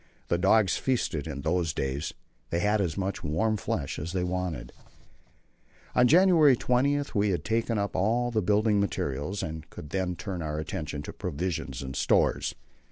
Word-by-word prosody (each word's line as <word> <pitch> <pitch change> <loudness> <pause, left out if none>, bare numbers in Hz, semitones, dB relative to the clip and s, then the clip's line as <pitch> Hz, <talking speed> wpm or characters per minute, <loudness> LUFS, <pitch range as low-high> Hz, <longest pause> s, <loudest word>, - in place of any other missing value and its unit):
The 85 - +2
dogs 100 0 +4
feasted 100 - -1
in 70 -3 -5
those 85 0 0
days 70 +3 -2 0.4
they 85 - 0
had 105 +4 +2
as 85 -5 -1
much 95 0 -2
warm 110 +9 +1
flesh 105 - -3
as 80 +4 -5
they 90 -1 0
wanted. 90 -9 -3 1.2
On 125 0 +5
January 165 -3 +6
20 130 +4 +2
we 105 0 +2
had 85 -6 -1
taken 115 0 0
up 100 0 -2
all 120 +5 +1
the 110 -2 +1
building 105 +2 +3
materials, 90 -2 -2
and 80 -1 -6
could 75 - -10
then 95 -1 -1
turn 85 +3 -5
our 75 -1 -3
attention 75 -1 -4
to - - -7
provisions 90 -2 -3
and 65 -1 -6
stores. - - +2
90 Hz, 165 wpm, -28 LUFS, 80-110 Hz, 1.2 s, January